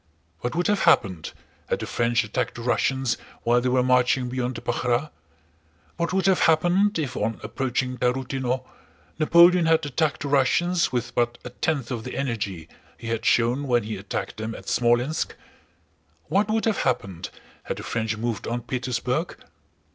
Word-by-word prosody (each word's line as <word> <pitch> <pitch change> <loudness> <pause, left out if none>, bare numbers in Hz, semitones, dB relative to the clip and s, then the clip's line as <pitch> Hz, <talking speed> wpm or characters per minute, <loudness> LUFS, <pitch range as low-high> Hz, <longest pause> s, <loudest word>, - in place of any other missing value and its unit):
What 120 +8 -3
would 175 +1 0
have 205 -1 +2
happened 90 -5 +3 0.4
had - - +1
the - - -5
French 120 0 +1
attacked 105 - -2
the 120 - -7
Russians 130 0 +1 0.3
while 120 +1 +3
they 125 - 0
were 125 0 +3
marching 125 0 +2
beyond 125 0 -2
the 115 - -6
Pakhrá? 125 +4 -1 0.9
What 170 - -1
would 190 0 +1
have 190 -2 +4
happened 175 +6 +3
if 145 -6 -3
on 110 +1 -2
approaching 125 -1 -2
Tarútino, 130 0 -1 0.5
Napoleon 170 +2 +6
had 160 -1 +3
attacked 145 +1 -1
the - - -3
Russians 165 +6 +2
with 125 -1 -2
but 120 0 0
a 125 - -6
tenth 135 -1 -2
of 115 -3 -3
the 125 - -6
energy 105 - -3 0.3
he 115 - -7
had 115 -1 -2
shown 125 +4 +2
when 120 -3 +2
he 110 +1 -4
attacked 100 +1 -5
them 110 +1 -4
at - - -11
Smolénsk? 120 +6 +1 1.0
What 205 +3 +2
would 220 0 +1
have 220 -2 +1
happened 100 - -2 0.4
had - - -3
the - - -7
French 110 -1 -2
moved 115 0 -3
on 120 +1 -2
Petersburg?... 125 +5 -2
125 Hz, 170 wpm, -25 LUFS, 120-150 Hz, 1.0 s, Napoleon